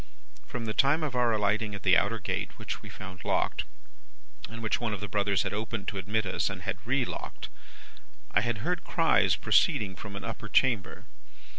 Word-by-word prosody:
"From 120 -2 -4
the 110 - -2
time 145 +7 +3
of 145 -4 -1
our 120 -1 +3
alighting 105 0 +1
at 100 - -8
the 95 -2 +6
outer 105 +4 +3
gate 100 - -3
(which - - -5
we - - -10
found 90 0 -9
locked, - - 0 0.8
and 115 0 -7
which 110 - 0
one 115 -3 0
of - - -7
the 100 - -4
brothers 100 -1 +1
had - - -3
opened 105 -1 -3
to 100 - -4
admit 105 +3 0
us, 90 - 0
and 95 -2 -6
had 95 - -3
relocked), 125 +1 -2 0.8
I - - +3
had 120 -1 -2
heard 180 +1 0
cries - - +3
proceeding 95 -3 +3
from 100 +2 -8
an 100 - -5
upper 115 -1 -5
chamber. 115 -3 +2
105 Hz, 190 wpm, -29 LUFS, 100-115 Hz, 0.8 s, the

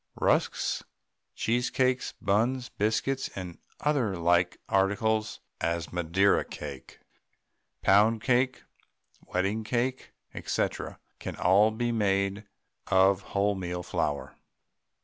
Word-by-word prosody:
Rusks, - - +1 0.5
cheesecakes, 125 +2 0
buns, 120 +6 +1
biscuits, 110 +6 -1
and 90 -3 -7 0.2
other 130 -10 +1
like 85 +1 +2
articles 105 +3 +1 0.2
as 85 0 -2
Madeira 90 +3 +2
cake, 70 -3 -9 0.8
pound 110 +3 +4
cake, 130 +1 +1 0.6
wedding 100 +4 -1
cake, 125 +3 -2 0.3
&c., - - +1 0.5
can - - -5
all 100 +4 +4
be 120 +2 -1
made 100 -1 0 0.4
of 95 0 +4
wholemeal 95 -3 -1
flour. 80 -6 -2
100 Hz, 90 wpm, -28 LUFS, 90-115 Hz, 0.8 s, pound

